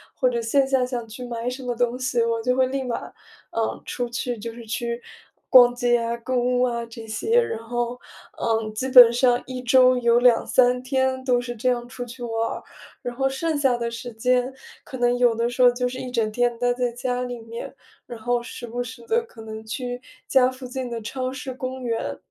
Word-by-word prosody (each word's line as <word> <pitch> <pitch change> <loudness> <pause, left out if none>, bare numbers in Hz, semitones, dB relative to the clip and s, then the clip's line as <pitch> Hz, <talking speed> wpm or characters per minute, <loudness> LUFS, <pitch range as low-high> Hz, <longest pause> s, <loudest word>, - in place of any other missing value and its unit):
或 255 - +2
者 240 -2 0
线 265 +4 +2
下 265 -1 +2
想 245 -2 -3
去 220 +3 -8
买 235 0 -4
什 250 +2 -3
么 245 -1 -3
东 245 +1 0
西， 250 -2 +1
我 230 0 0
就 250 +2 +1
会 260 0 +4
立 270 +1 -2
马， 245 -2 -2 0.6
呃， 225 -1 -2
出 245 -1 -3
去 240 +1 -3
就 230 +2 -6
是 235 0 -10
去 235 +2 -3 0.5
逛 245 -1 +8
街 245 -1 +2
啊、 230 0 -2
购 255 +2 -3
物 250 0 +1
啊 235 -2 -1
这 230 -1 -10
些。 445 - +2
然 455 - -3
后， 240 +1 -3 0.4
嗯， 225 -1 0
基 235 +5 -2
本 250 -3 +10
上 245 0 +3
一 255 -1 -5
周 255 0 +5
有 235 -1 +4
2-3 250 +1 +4
天 260 0 0
都 245 -2 +3
是 240 0 -6
这 235 - -2
样 240 -1 0
出 245 0 -6
去 245 +1 -11
玩 235 - -4 0.3
儿， - - -11 0.4
然 245 -1 -4
后 270 +1 +1
剩 300 +4 -1
下 270 -4 +3
的 235 0 -2
时 230 +1 -7
间， 250 +3 +1 0.3
可 260 - -7
能 245 0 +2
有 245 -2 +4
的 235 +1 0
时 245 +1 -2
候 250 - +8
就 250 0 -1
是 255 - -7
一 255 - -5
整 225 -3 0
天 240 +1 +1
待 245 0 +2
在 245 0 0
家 245 +1 -2
里 245 -1 -5
面， 230 +4 -8 0.3
然 235 - -9
后 245 +2 0
时 240 - -8
不 240 +2 -3
时 235 0 -9
地 465 +1 +2
可 240 - -14
能 220 0 -8
去 245 +2 -4 0.3
家 255 -1 +4
附 260 0 -10
近 255 0 -4
的 235 -1 -4
超 255 +4 -3
市、 260 0 -6
公 255 0 -5
园。 230 -2 -2
245 Hz, 235 characters per minute, -24 LUFS, 235-255 Hz, 0.6 s, 本